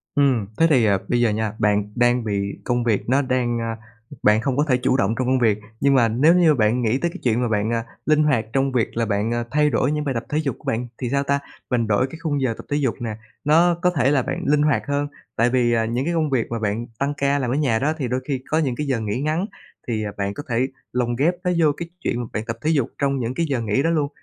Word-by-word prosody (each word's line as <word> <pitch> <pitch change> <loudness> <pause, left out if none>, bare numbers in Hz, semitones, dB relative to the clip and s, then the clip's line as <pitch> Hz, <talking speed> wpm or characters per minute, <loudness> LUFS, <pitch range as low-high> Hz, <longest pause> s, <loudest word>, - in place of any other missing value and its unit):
Ừm, 135 -7 +3
thế 165 - +5
thì 125 -8 +4 0.2
bây 120 - +2
giờ 120 - +4
nha, 110 0 -1
bạn 105 -1 +1
đang 120 0 +2
bị 100 -2 -2
công 120 -1 0
việc 115 -2 0
nó 135 +2 +4
đang 125 -3 0 0.7
bạn 105 +1 +4
không 135 0 -1
có 145 - +3
thể 125 - +4
chủ 130 - +3
động 100 0 +1
trong 130 - -1
công 130 0 +2
việc. 110 -4 +3 0.2
Nhưng 140 0 +3
mà 120 -3 +5
nếu 130 +9 +4
như 170 -4 +5
bạn 115 +2 +2
nghĩ 115 +3 +1
tới 170 +3 -1
cái - - -8
chuyện 120 0 +2
mà 120 - +1
bạn, 105 +1 0
ờ, 115 -1 0 0.2
linh 155 0 +4
hoạt 135 -7 +2
trong 135 0 +1
việc 125 -3 +1
là 115 - +1
bạn 105 +2 -1 0.2
thay 150 0 +3
đổi 130 +2 +1
những 150 0 -1
bài 135 - -1
tập 115 -1 -3
thể 150 - -1
dục 140 -6 -1
của - - -22
bạn 120 +2 -1
thì 125 - -3
sao 140 +2 +1
ta? 140 0 +1 0.3
Mình 120 -3 +1
đổi 105 +5 +2
cái 165 - -9
khung 145 -3 0
giờ 125 -3 +1
tập - - -10
thể 145 - +2
dục 135 -5 0
nè, 115 -2 -3 0.3
nó 170 +4 +4
có 180 - +4
thể 145 -5 +2
là 140 - +3
bạn - - -4
linh 145 0 +3
hoạt 150 -2 +2
hơn. 145 0 0 0.3
Tại 120 +2 +3
vì 120 -2 +2
những 125 +4 -1
cái 170 - 0
công 160 -3 +1
việc 125 -4 0
mà 115 - -2
bạn 110 +2 -2
tăng 140 +1 0
ca 140 +1 +1
làm 125 -3 -1
ở - - 0
nhà 135 -7 +1
đó, 150 +5 +1
thì 130 -5 -2
đôi 125 +2 -1
khi 135 -3 -2
có 155 - +1
những 135 -6 0
giờ 140 -5 0
nghỉ 110 +2 -2
ngắn, 155 +6 0 0.4
thì 110 -2 -1
bạn 100 0 -2
có 145 - -7
thể 120 +3 +1 0.3
lồng 120 -1 0
ghép 155 +8 +2
nó 180 - +1
vô 155 -3 +4
cái 170 -1 -6
chuyện 120 - -1
mà - - -4
bạn 105 - -2
tập 115 0 -4
thể 155 - 0
dục 140 -7 +1
trong 140 -1 0
những 120 +1 -2
giờ 130 -4 -1
nghỉ 115 +6 0
đó 165 - +2
luôn. 155 -4 +1
130 Hz, 275 wpm, -22 LUFS, 115-145 Hz, 0.7 s, thế